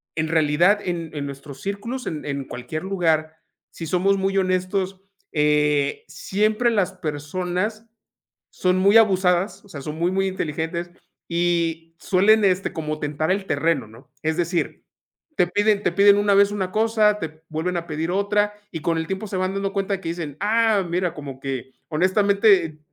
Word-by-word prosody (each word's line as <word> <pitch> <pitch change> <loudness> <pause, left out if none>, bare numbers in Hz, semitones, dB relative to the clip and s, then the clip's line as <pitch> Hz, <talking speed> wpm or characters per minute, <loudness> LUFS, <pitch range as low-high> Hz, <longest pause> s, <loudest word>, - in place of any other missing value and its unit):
en 155 0 -1
realidad 165 +5 +3
en 170 -3 -3
en 145 -2 -4
nuestros 140 0 -9
círculos, 230 +6 -4
en 155 -2 -4
en 140 -2 -3
cualquier 145 +7 -6
lugar, 160 -5 0 0.4
si 165 - -7
somos 190 +4 +2
muy 195 0 0
honestos, 185 +1 -1 0.3
eh, 150 -1 +2
siempre 215 +9 0
las 200 -5 +1
personas 180 +7 -3 0.6
son 185 0 +1
muy 200 +3 +6
abusadas. 190 -2 +2
O - - -19
sea, 145 -7 -8
son 150 +2 -5
muy, 170 +2 +1
muy 195 0 +1
inteligentes, 170 -1 -3 0.4
y 170 -1 -1
suelen 210 +3 +4
este 190 0 +1
como 155 -1 -4
tentar 150 +3 -1
el 195 0 0
terreno, 160 -9 0
¿no? 115 +5 -17
Es 160 0 0
decir, 175 0 -2 0.5
te 175 - +4
piden 205 +2 +2
te - - +2
piden 200 +2 +6
una 205 0 +3
vez 200 0 +5
una 190 -3 -2
cosa, 215 -1 +2
te 160 -3 -7
vuelven 165 +3 -2
a 170 0 -5
pedir 160 +2 -2
otra, 205 +2 +1 0.2
y 165 -3 -5
con 165 +1 0
el 160 0 -2
tiempo 190 +3 -4
se 190 -2 -4
van 185 +1 -1
dando 195 0 -2
cuenta 200 0 -1
de 190 - -9
que 165 - -4
dicen: 160 -4 -5
"Ah, 215 -1 +2
mira", 175 0 0
como 140 -3 -8
que 130 -2 -4 0.2
honestamente, 190 -1 +3
180 Hz, 175 wpm, -23 LUFS, 155-200 Hz, 0.6 s, muy